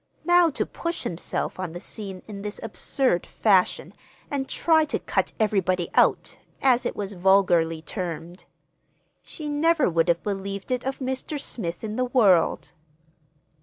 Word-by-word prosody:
Now 350 0 +5
to 290 - -2
push 335 0 -4
himself 175 +2 -3
on 180 -3 -4
the 175 - -6
scene 195 -1 -6
in 200 -2 -7
this 210 +1 -5
absurd 225 -2 0
fashion 195 -4 +2 0.4
and 275 -2 -2
try 320 -2 +3
"to 305 - -1
cut - - -1
everybody 185 -5 +1
out," - - +2 0.2
as 255 -2 +3
it - - -5
was 205 -1 -4
vulgarly 175 -4 +3
termed—she 175 - -9
never 305 +1 +2
would 165 +1 +2
have 170 -1 +1
believed 200 +1 -4
it 250 -1 0
of 270 0 -2
Mr. 265 +3 -3
Smith 180 -10 -4
in 215 +1 -4
the 255 - +1
world. 210 -10 +3
205 Hz, 145 wpm, -25 LUFS, 180-265 Hz, 0.4 s, Now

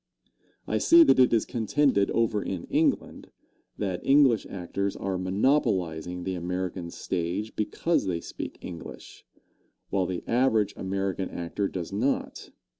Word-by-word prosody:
I - - 0
see 335 0 +7
that 300 - +4
it 130 - +6
is 115 - +2
contended 115 -2 +1
over 110 -3 +1
in 95 -3 -4
England, - - 0 0.5
that 95 -4 -3
English 135 -6 +4
actors 100 +1 -3
are 95 -1 -3
monopolizing 90 - 0
the 95 - -2
American 90 0 -3
stage 90 +6 -3
because 160 - 0
they 85 -3 -1
speak - - -7
English, 85 -2 -10 0.6
while 95 -2 +1
the 90 -1 -4
average 115 -5 +2
American 95 0 -2
actor 85 +4 -3
does 90 -1 -6
not. 115 +7 -2
95 Hz, 130 wpm, -27 LUFS, 90-110 Hz, 0.6 s, see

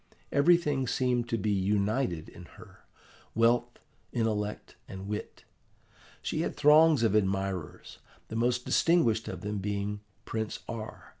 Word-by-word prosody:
Everything 145 -3 +3
seemed 125 -1 0
to 115 - 0
be 105 0 -1
united 100 -2 0
in 90 - -12
her, - - -16 0.5
wealth, 120 +1 +2 0.3
intellect, 105 -3 -2
and 95 +1 -8
wit. 105 0 -6 0.8
She - - -1
had - - -2
throngs 150 -2 +6
of 110 -3 +3
admirers, 95 -5 -2 0.3
the - - -7
most 120 +2 +1
distinguished 120 -11 +2
of - - -6
them 105 0 -3
being 100 +1 -3 0.3
Prince 110 -1 -4
R. 110 -1 -7
110 Hz, 130 wpm, -29 LUFS, 100-125 Hz, 0.8 s, throngs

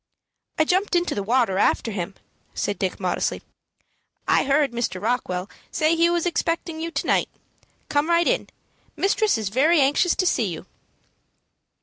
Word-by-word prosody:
"I 315 - +4
jumped 375 +3 +1
into 350 0 +1
the 205 - -2
water 225 -2 +1
after 225 - +1
him," 190 -1 -4 0.4
said - - -2
Dick, - - -2
modestly. - - -1 0.8
"I - - +3
heard 280 0 +2
Mr. 235 -6 -2
Rockwell 195 -4 -2 0.2
say 315 0 +1
he 335 +1 +3
was 345 0 0
expecting 330 -1 -2
you 335 - -3
to - - -3
night. - - +1 0.6
Come 290 +3 0
right 340 0 +3
in. - - +1 0.5
Mistress 400 - +2
is 215 -3 -3
very 300 +10 +3
anxious 290 +6 +3
to 370 - 0
see 240 -9 +2
you." 165 -4 -6
295 Hz, 155 wpm, -23 LUFS, 225-340 Hz, 0.8 s, I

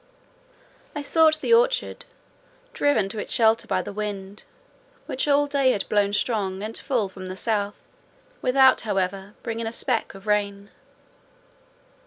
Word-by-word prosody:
I 295 - -3
sought 315 +1 +3
the 465 - +2
orchard, - - +2 0.7
driven 280 -9 +2
to 215 +1 -6
its - - -6
shelter 225 -2 +3
by - - 0
the - - -7
wind, 205 -1 -6 0.6
which 265 - -2
all 290 0 +4
day 280 -3 +2
had 200 - -2
blown 205 -1 +2
strong 205 -3 -1
and 220 +1 -5
full 245 -7 0
from 190 0 -9
the 185 - -6
south, 205 -1 -1 0.6
without, 260 0 +5
however, 195 -1 -2
bringing 230 0 -3
a - - -3
speck 235 -3 -1
of 195 +1 -13
rain. 205 -1 -1
220 Hz, 145 wpm, -24 LUFS, 200-265 Hz, 0.7 s, without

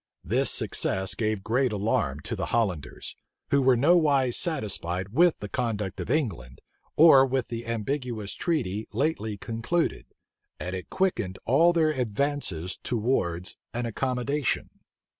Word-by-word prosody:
This - - +1
success 95 0 +1
gave 110 -3 -2
great 125 +3 +1
alarm 95 -9 -1
to - - -3
the - - -3
Hollanders, 90 - -2 0.4
who 140 - +4
were 130 -2 +4
nowise 145 -4 +3
satisfied 95 - -1
with 170 - +3
the 105 - -6
conduct 105 -3 -3
of - - -5
England, 80 - -1 0.4
or 150 -4 +8
with 130 -2 -1
the 115 -1 -5
ambiguous 115 -2 -3
treaty 115 - -2
lately 110 -4 -1
concluded; 115 - -2 0.5
and 90 +1 -4
it 90 - -7
quickened 115 - -1
all 160 +8 +5
their 160 -2 +2
advances 120 - -1
towards 95 -7 -1 0.2
an 120 0 -1
accommodation. 130 +4 -1
115 Hz, 130 wpm, -27 LUFS, 100-140 Hz, 0.5 s, or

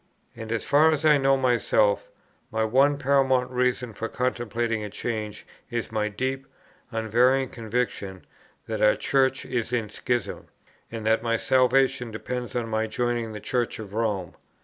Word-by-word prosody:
"And 110 -1 -7
as 115 - -1
far 150 +3 +5
as 155 -1 0
I 150 -2 +6
know 135 0 +3
myself, 120 -5 +2 0.4
my 110 0 0
one 135 +6 +3
paramount 130 -2 +2
reason 125 -1 0
for 115 +3 -4
contemplating 120 -3 -1
a 105 - -5
change 105 -1 -4 0.2
is 120 -1 -3
my 105 -1 0
deep, 130 +5 -3 0.4
unvarying 120 +4 +2
conviction 110 -5 -3 0.4
that 110 -2 -4
our 105 - +5
Church 130 -1 +1
is 120 -1 -2
in 115 -4 -1
schism, 120 +1 -3 0.4
and 115 -2 -6
that 110 +1 +3
my 115 0 0
salvation 130 0 +2
depends 125 +3 -5
on 120 -2 -1
my 110 0 -1
joining 120 0 -2
the 105 - -6
Church 120 +3 -1
of 105 -3 -9
Rome. 105 -6 -1
120 Hz, 155 wpm, -25 LUFS, 110-130 Hz, 0.4 s, I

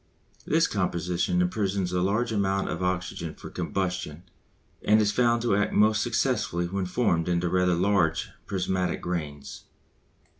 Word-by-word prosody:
This 165 +2 +3
composition 90 -2 0
imprisons 95 -1 -1
a 90 - +1
large 110 +6 +1
amount 100 -2 0
of - - -3
oxygen 90 -2 -2
for - - -10
combustion 90 -4 -3 0.6
and 110 +1 +5
is 105 -1 +2
found 120 +1 +2
to 115 -5 +2
act 105 +1 0
most 110 0 +4
successfully 85 +1 0
when 95 +1 -2
formed 90 -5 +1
into 90 0 +1
rather 90 0 +2
large 90 -3 +1 0.2
prismatic 90 -2 -1
grains. 75 -5 -5
90 Hz, 140 wpm, -27 LUFS, 90-100 Hz, 0.6 s, and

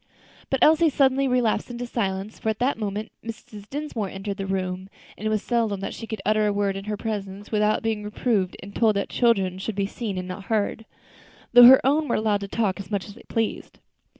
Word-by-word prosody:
But 270 - +1
Elsie 320 +1 +6
suddenly 270 -1 +2
relapsed 250 -3 +1
into 245 0 -5
silence, 200 -3 -3
for 220 - -1
at 220 - -1
that 255 +1 0
moment 210 +1 -3
Mrs. 220 -2 -9
Dinsmore 275 -8 -3
entered 195 +1 -5
the 195 -1 -4
room, 185 0 -3 0.3
and 215 - -4
it - - +1
was 215 -1 0
seldom 225 -5 0
that 195 - -4
she 225 - -8
could 220 -3 -5
utter 215 +1 +3
a - - +2
word 200 -1 0
in 195 0 -6
her 210 0 -3
presence 205 -2 -5
without 210 0 +2
being 220 -2 -1
reproved 210 -2 -1
and 200 +1 -10
told 220 -3 +3
that 200 - -1
"children 195 -6 +2
should 210 +2 -4
be 200 -1 0
seen 205 -1 -4
and 185 0 -4
not 190 +2 -7
heard," 220 0 -1 0.7
though 245 0 +10
her 260 +2 +10
own 295 +3 +2
were - - +1
allowed 215 -2 +1
to 200 - -4
talk 205 -2 -1
as 195 - -8
much 200 -3 -2
as 205 - -10
they 230 - -15
pleased. 225 -2 -2
215 Hz, 225 wpm, -24 LUFS, 195-235 Hz, 0.7 s, though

